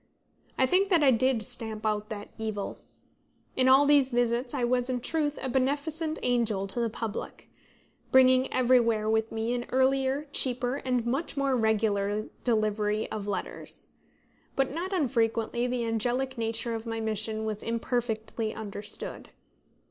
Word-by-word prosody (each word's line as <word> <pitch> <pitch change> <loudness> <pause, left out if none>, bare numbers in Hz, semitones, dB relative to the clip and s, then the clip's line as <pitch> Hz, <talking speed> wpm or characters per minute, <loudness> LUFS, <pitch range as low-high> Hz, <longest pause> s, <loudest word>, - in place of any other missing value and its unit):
I 260 - +4
think 375 +8 +2
that 340 -5 +4
I 270 - +6
did 250 -1 +2
stamp 220 0 -5
out 210 0 -1
that 210 -2 -6
evil. 215 -2 -4 0.8
In 255 0 +3
all 270 +2 +7
these 285 -2 +5
visits 245 0 0
I 265 -4 -1
was, 245 +1 +1
in 250 -1 0
truth, 295 +3 -1
a 265 - -3
beneficent 290 +5 -1
angel 230 -5 +1
to 195 +5 -2
the 235 -1 +1
public, 220 -1 -6 0.6
bringing 260 0 +5
everywhere 235 -4 +3
with 220 0 +1
me 225 +2 -1
an 245 0 -3
earlier, 265 +2 +1
cheaper, 250 0 +3
and 250 -4 -1
much 275 +5 -1
more 275 -1 +1
regular 215 -2 +1 0.2
delivery 215 -2 0
of 205 -2 -4
letters. 195 -3 -4 0.7
But 270 -1 +1
not 355 +5 -3
unfrequently 235 - 0
the 245 -1 -1
angelic 245 +4 -1
nature 230 0 -1
of 225 0 -5
my 225 0 -3
mission 220 0 -2
was 215 -1 -3
imperfectly 230 -2 -2
understood. 205 -1 -4
240 Hz, 150 wpm, -28 LUFS, 220-260 Hz, 0.8 s, all